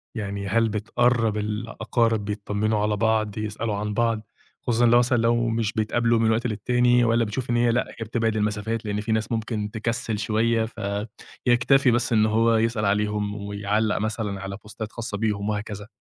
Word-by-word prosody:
يعني 100 -2 -4
هل 115 +2 +2
بتقرّب 110 +1 +1
الأقارب 110 +1 -1
بيتطمنوا 105 +1 -1
على 105 0 +1
بعض، 110 -1 +1
يسألوا 110 0 -3
عن 105 +1 -3
بعض، 115 -1 +1 0.4
خصوصًا 120 -3 +2
لو 120 +1 +6
مثلًا 120 0 +2
لو 120 +1 +2
مش 115 -1 -1
بيتقابلوا 115 +1 +1
من 110 0 +3
وقت 115 +2 +1
للتاني 120 +3 +2
والّا 115 0 +3
بتشوف 115 +4 -4
إن 120 - +2
هي 120 0 +3
لأ، 120 - +1
هي 115 - -7
بتبعد 115 -1 0
المسافات 105 +1 -1
لإن 105 0 -2
فيه 110 +1 -3
ناس 110 +1 -1
ممكن 110 -2 -2
تكسِّل 115 -1 -2
شوية، 110 +1 +1 0.8
فيكتفي 125 +2 +4
بس 120 0 +1
إن 110 -1 +4
هو 115 +1 +3
يسأل 110 -1 0
عليهم 105 0 0
ويعلّق 105 +1 -1
مثلًا 105 -2 -3
على 100 +1 -5
بوستات 110 0 -7
خاصة 115 -3 -5
بيهم 105 -1 -1
وهكذا؟ 105 -1 -4
110 Hz, 170 wpm, -24 LUFS, 105-115 Hz, 0.8 s, لو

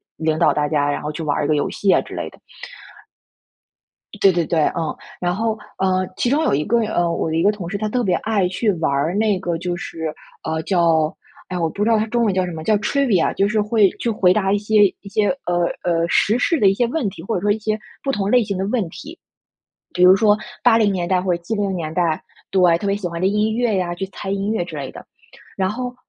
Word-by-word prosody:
领 160 -1 -1
导 - - +4
大 150 - 0
家， 145 -1 +1
然 145 - -2
后 150 - -4
去 160 +1 -6
玩 145 -1 0
儿 150 - -1
一 - - 0
个 155 - +3
游 145 - 0
戏 200 - +1
啊 - - +5
之 - - -10
类 - - -4
的。 - - -20 1.8
对 195 - +6
对 170 -2 0
对， 165 +1 0 0.2
嗯， 160 -2 -2 0.2
然 175 0 -1
后， 220 +1 -1 0.2
呃， 185 -1 +1
其 245 - 0
中 290 +4 +2
有 - - +2
一 145 +2 +1
个 235 +8 +1
呃， 175 -5 0
我 165 - -1
的 160 - -2
一 165 - +1
个 205 - +5
同 195 -5 -7
事， 200 - -3
他 215 +1 -2
特 245 +3 0
别 185 -4 +2
爱 210 -4 0
去 205 +4 0
玩 160 -4 -1
儿 140 +5 0
那 210 -2 +2
个 175 -3 -2
就 175 +1 -3
是 160 -2 -5 0.3
呃， 160 0 -2
叫 165 -4 +2 0.4
哎， 180 - -3
我 165 -2 0
不 200 +6 -3
知 220 - +2
道 225 - +4
它 215 - +1
中 235 +1 0
文 210 - +2
叫 185 0 +1
什 180 - -5
么， 160 -1 -6
叫 215 +6 +3
Trivia， 210 -4 +1
就 195 - +1
是 215 0 +1
会 210 -1 +3
去 235 - -1
回 190 -5 +3
答 195 -1 +1
一 - - +3
些 210 0 +3 0.2
一 200 - -11
些， 205 +1 +1 0.2
呃， 175 0 +1 0.2
呃， 170 -1 +1
时 215 +7 +2
事 325 +5 +1
的 200 - +5
一 195 - +2
些 240 +3 +1
问 255 -4 -1
题， 180 - -11
或 225 - -2
者 180 - -1
说 205 +1 +2
一 215 - 0
些 215 0 -1 0.3
不 275 - 0
同 205 -4 -1
类 250 -1 +5
型 200 -2 -3
的 190 - -1
问 210 -5 0
题。 315 - -11 0.8
比 180 - 0
如 180 +1 +8
说 210 0 +4 0.3
80 225 -4 +4
年 180 -2 -2
代 185 0 +2
或 180 -1 0
者 170 - -14
70 205 0 -2
年 155 -3 -4
代 165 -2 0 0.3
对， 180 -3 +4
特 200 - -4
别 200 - +1
喜 200 -3 -5
欢 170 0 -6
的 185 - +2
音 210 +2 +1
乐 235 -3 +1
呀， 175 -2 -1
去 190 +2 -4
猜 195 0 -7
音 200 +1 -1
乐 220 -6 -1
之 165 -3 -8
类 135 -2 -5
的。 - - -11 0.5
然 190 -1 +1
后 250 +3 -4
190 Hz, 285 characters per minute, -20 LUFS, 170-215 Hz, 1.8 s, 如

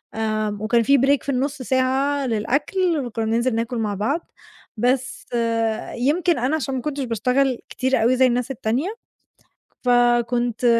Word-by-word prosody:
آمم 215 -2 -2
وكان 230 +2 +2
في 280 +5 +4
break 275 +2 +2
في - - -5
النُص 275 +1 -2
ساعة 265 +2 +1
للأكل 285 - 0
وكنّا 225 -2 -3
بننزل 230 +2 +1
ناكل 230 +2 -2
مع 215 -2 -1
بعض، 270 - -2 0.5
بس 250 +3 0 0.7
يمكن 315 +6 +1
أنا 260 +6 +1
عشان 270 -3 -2
ما 255 - -2
كنتش 285 0 -3
باشتغل 250 +2 +1
كتير 260 -1 0
أوي 245 +3 +4
زي 260 0 +5
الناس 245 +1 -1
التانية، 265 - -2 0.9
فكنت 240 -1 +2
250 Hz, 145 wpm, -22 LUFS, 230-275 Hz, 0.9 s, زي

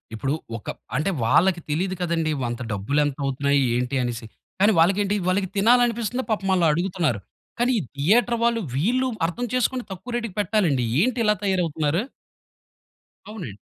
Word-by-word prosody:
ఇప్పుడు 135 +6 -1 0.2
ఒక 105 - -15 0.3
అంటే 165 +6 +1
వాళ్ళకి 170 +9 +3
తెలీదు 185 +5 0
కదండీ. 165 -3 0 0.2
అంత 120 +1 -5
డబ్బులేంత 140 +8 0
అవుతున్నాయి? 140 +1 +1 0.2
ఏంటి? 125 +2 -1
అనేసి. 120 -1 -3 0.3
కానీ 205 +3 +5
వాళ్ళకేంటి 195 +4 +3
వాళ్ళకి 190 +1 +1
తినాలనిపిస్తుంది 240 +2 +2
పాపం 200 -3 -1
ఆళ్ళు 180 -2 +3
అడుగుతున్నారు. 170 - 0 0.4
కానీ 245 +1 +3
ఈ - - -2
థియేటర్ 230 +12 +3
వాళ్ళు 235 -1 +2
వీళ్ళు 245 - +1 0.2
అర్థం 180 +9 -2
చేసుకొని 255 0 0
తక్కువ 210 +6 -7
రేట్‌కి 230 -6 -3
పెట్టాలండి. 180 - +1 0.2
ఏంటి 245 +6 +2
ఇలా 210 0 +4
తయారవుతున్నారు? 170 -3 0 1.3
అవునండి. 165 - -7
185 Hz, 140 wpm, -23 LUFS, 145-220 Hz, 1.3 s, కానీ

